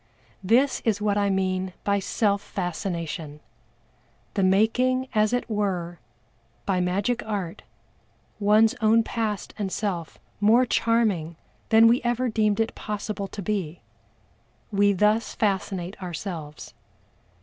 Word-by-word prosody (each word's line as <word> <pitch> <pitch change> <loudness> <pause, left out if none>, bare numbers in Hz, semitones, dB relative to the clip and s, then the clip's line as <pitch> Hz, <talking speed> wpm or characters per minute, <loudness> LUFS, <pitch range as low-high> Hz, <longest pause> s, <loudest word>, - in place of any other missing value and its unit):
This 245 +8 +3
is 215 -3 +1
what 210 -1 +1
I 200 -1 +1
mean 185 -1 -1
by 200 0 +1
self 200 0 0
fascination 170 -5 -4 0.9
the 200 - 0
making, 235 +7 +2
as 215 -1 +3
it 245 0 -1
were, 185 -6 -2 0.7
by 190 -2 +1
magic 200 +7 0
art, 200 -6 -4 0.8
one's 215 +2 +4
own 225 +1 +4
past 220 -3 -3
and 195 -2 -2
self 180 -6 -3 0.2
more 225 +5 +5
charming 215 -9 +1 0.3
than 225 +1 +7
we 235 +2 +4
ever 240 +1 0
deemed 215 -1 +1
it 225 0 0
possible 210 -1 -4
to 200 +1 -7
be. 180 -5 -3 0.9
We 205 0 +4
thus 210 +3 +1
fascinate 195 -3 -2
ourselves. 170 -4 -6
205 Hz, 120 wpm, -25 LUFS, 185-220 Hz, 0.9 s, than